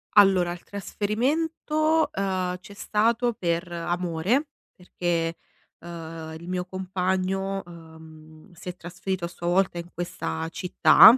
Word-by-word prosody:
Allora, 190 -4 +7
il 175 - -7
trasferimento, 305 +10 +1
uhm, 185 -2 0
c'è 200 +2 -12
stato 230 +4 +2
per 170 -2 -1
amore, 175 - 0 0.3
perché, 170 -2 -1 0.4
uhm, 165 -1 -7
il 170 +2 -11
mio 180 0 -1
compagno, 190 +1 -1
uhm, 160 0 -13
si 180 +1 -8
è 180 - -5
trasferito 175 +1 -3
a - - -2
sua 175 0 -6
volta 180 -1 +3
in 170 - -6
questa 160 -1 -3
città. 205 +5 +8
180 Hz, 125 wpm, -26 LUFS, 170-195 Hz, 0.4 s, città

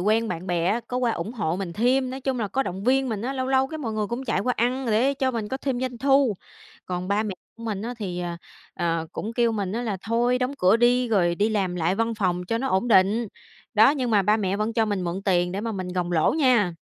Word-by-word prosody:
quen 220 +4 +2
bạn 170 +3 -5
bè 175 -1 0
á 215 +6 +1
có 250 - -3
qua 245 -2 +1
ủng 220 - -4
hộ 175 -8 -1
mình 190 -3 -4
thêm, 255 +6 +1
nói 265 +1 -6
chung 265 -1 -1
là 210 - -1
có 265 +7 0
động 190 -1 -5
viên 265 +1 +2
mình 215 -3 -3
á, 255 +3 -2
lâu 260 -1 -2
lâu 265 0 +3
cái 315 +3 -7
mọi 235 -7 -3
người 215 -1 -1
cũng 240 +4 -4
chạy 195 - 0
qua 250 +4 0
ăn 250 +3 0
để 235 +5 +2
cho 265 -1 0
mình 225 -4 -3
có 265 - -2
thêm 270 -3 -2
doanh 255 -2 -3
thu, 270 -4 +3 0.5
còn 180 0 -4
ba 205 +2 +2
mẹ 210 -3 -4 0.2
mình 220 -4 -4
á 240 +2 -4
thì, 180 -5 -4
ờ, 175 -1 -4 0.4
ờ, 165 -2 -1
cũng 220 - -4
kêu 235 -1 +2
mình 200 -3 -2
á 235 +3 -2
là 215 -5 -2
thôi, 240 +2 +2
đóng 255 +2 -1
cửa 185 +4 +5
đi 245 +1 +3
rồi 175 -6 +2
đi 205 +4 +1
làm 195 -5 0
lại 175 +1 0
văn 230 +2 0
phòng 180 -4 -1
cho 230 +5 -1
nó 265 - -2
ổn 190 +6 +1
định, 210 +2 +4 0.5
đó, 220 +5 +7
nhưng 260 -5 -1
mà 205 -3 +4
ba 210 +3 +3
mẹ 195 -2 -1
vẫn 215 +2 -1
cho 225 0 +2
mình 205 -3 -2
mượn 175 +3 -3
tiền 180 -2 +1
để 195 - -3
mà 225 +1 -3
mình 185 -3 -4
gồng 180 -1 -2
lỗ 160 -2 +3
nha. 245 - +3
220 Hz, 275 wpm, -24 LUFS, 190-250 Hz, 0.5 s, đó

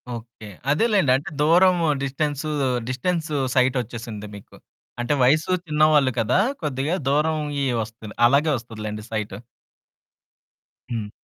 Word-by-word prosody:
Okay. 115 -1 -11 0.3
అదేలెండి. 195 - +3
అంటే, 135 - -3
దూరము, 175 +2 +4 0.2
డిస్టెన్సూ, 145 +2 -2 0.4
డిస్టెన్సు 155 +4 -2 0.2
సైటొచ్చేసింది 120 -4 -1
మీకు. 100 - -13 0.5
అంటే, 120 +4 0
వయసు 155 +7 +3
చిన్నవాళ్ళు 150 -3 +3
కదా! 115 +9 +2 0.2
కొద్దిగా 145 +3 -1
దూరవుయ్యీ 150 -1 0 0.2
వస్తంది. 110 -1 -11
అలాగే 145 +5 +3
వస్తదిలేండి 110 -2 -7
సైటు. 105 -2 -4 1.5
హ్మ్. 110 -3 -3
140 Hz, 100 wpm, -23 LUFS, 115-155 Hz, 1.5 s, దూరము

